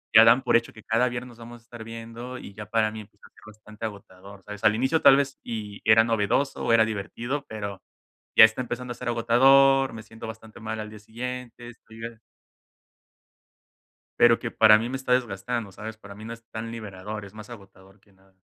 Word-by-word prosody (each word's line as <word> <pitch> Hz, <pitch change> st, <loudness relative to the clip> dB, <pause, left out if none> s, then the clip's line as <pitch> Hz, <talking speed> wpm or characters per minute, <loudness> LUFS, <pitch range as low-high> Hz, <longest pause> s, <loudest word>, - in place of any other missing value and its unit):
ya 115 Hz, -, +11 dB
dan 120 Hz, +3 st, +5 dB
por -, -, +2 dB
hecho 115 Hz, -, -5 dB
que 110 Hz, -, -15 dB
cada 115 Hz, +3 st, +2 dB
viernes 120 Hz, +1 st, -6 dB
nos 120 Hz, -, -16 dB
vamos 120 Hz, 0 st, -11 dB
a -, -, -29 dB
estar 120 Hz, -1 st, -11 dB
viendo 115 Hz, +2 st, -8 dB
y 100 Hz, -, -10 dB
ya 105 Hz, +1 st, -8 dB
para 110 Hz, -1 st, +1 dB
mí, 110 Hz, -, -8 dB
empezó 105 Hz, 0 st, -18 dB
a -, -, -16 dB
ser -, -, -21 dB
bastante 110 Hz, +1 st, -10 dB
agotador, 100 Hz, -2 st, -10 dB
¿sabes? 105 Hz, +1 st, -9 dB
Al 105 Hz, -, +5 dB
inicio 130 Hz, +7 st, +1 dB
tal 135 Hz, -, +8 dB
vez 135 Hz, -1 st, -1 dB
y 105 Hz, -3 st, -7 dB
era 110 Hz, +1 st, +7 dB
novedoso 115 Hz, +4 st, 0 dB
o 115 Hz, -, +2 dB
era 115 Hz, -, +6 dB
divertido, 115 Hz, +6 st, -4 dB
pero 100 Hz, -3 st, -6 dB, 0.5 s
ya -, -, +10 dB
está 110 Hz, +3 st, -4 dB
empezando 125 Hz, +1 st, -6 dB
a -, -, -9 dB
ser -, -, -6 dB
agotador, 135 Hz, +3 st, +4 dB
me 110 Hz, -, -8 dB
siento 110 Hz, +1 st, -11 dB
bastante 110 Hz, 0 st, -10 dB
mal 110 Hz, 0 st, -5 dB
al 105 Hz, -, -6 dB
día 110 Hz, -, -11 dB
siguiente, 120 Hz, +2 st, -7 dB
estoy 115 Hz, -1 st, -15 dB
ya 115 Hz, 0 st, -7 dB, 2.0 s
Pero 120 Hz, -1 st, +6 dB
que 115 Hz, -, -5 dB
para 110 Hz, -1 st, +6 dB
mí 115 Hz, +2 st, -3 dB
me 130 Hz, -, -3 dB
está 130 Hz, -1 st, 0 dB
desgastando, 120 Hz, -2 st, -2 dB
¿sabes? 110 Hz, +2 st, -8 dB
Para 100 Hz, -2 st, -12 dB
mí, 110 Hz, -, -11 dB
no 115 Hz, -, -6 dB
es 115 Hz, 0 st, -13 dB
tan 115 Hz, +1 st, -6 dB
liberador, 105 Hz, -2 st, -7 dB
es 100 Hz, -, -14 dB
más 110 Hz, 0 st, -11 dB
agotador 95 Hz, -3 st, -15 dB
que 100 Hz, 0 st, -28 dB
nada. 95 Hz, 0 st, -28 dB
115 Hz, 220 wpm, -25 LUFS, 105-120 Hz, 2.0 s, ya